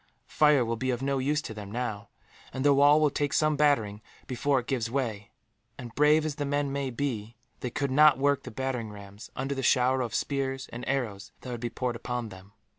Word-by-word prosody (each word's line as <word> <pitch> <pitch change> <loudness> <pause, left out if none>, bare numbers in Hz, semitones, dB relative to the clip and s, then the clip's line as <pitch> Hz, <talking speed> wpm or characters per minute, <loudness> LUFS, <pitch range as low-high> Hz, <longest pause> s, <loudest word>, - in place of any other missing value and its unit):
Fire 150 -5 +4
will 115 0 -2
be 130 +3 -2
of 125 0 -1
no 140 0 0
use 150 +4 0
to - - -6
them, 105 -2 -8
now; 110 -3 -4 0.4
and 130 +1 -3
the 145 - +6
wall 145 +2 +6
will 150 -2 +3
take 145 0 -1
some 155 -1 +2
battering 115 -9 +2 0.2
before 135 +2 +1
it 120 - -7
gives 120 -4 -1
way 115 -6 -3 0.5
and, 120 -3 -9
brave 150 +1 +4
as 150 -2 -3
the 145 - -1
men 145 0 -1
may 140 -1 -2
be, 120 -4 -3 0.2
they 125 - -3
could 140 +2 -2
not 150 0 +6
work 140 +1 +2
the - - -8
battering 125 -2 -3
rams 100 0 -11
under 135 +2 -2
the 135 - -3
shower 130 +1 +3
of 120 -5 -3
spears 135 -1 -2
and 120 +1 -6
arrows 115 -7 -2
that 125 - -7
would 120 -2 -5
be 120 - -2
poured 120 +1 -3
upon 120 0 -4
them. 95 0 -13
130 Hz, 220 wpm, -28 LUFS, 115-140 Hz, 0.5 s, the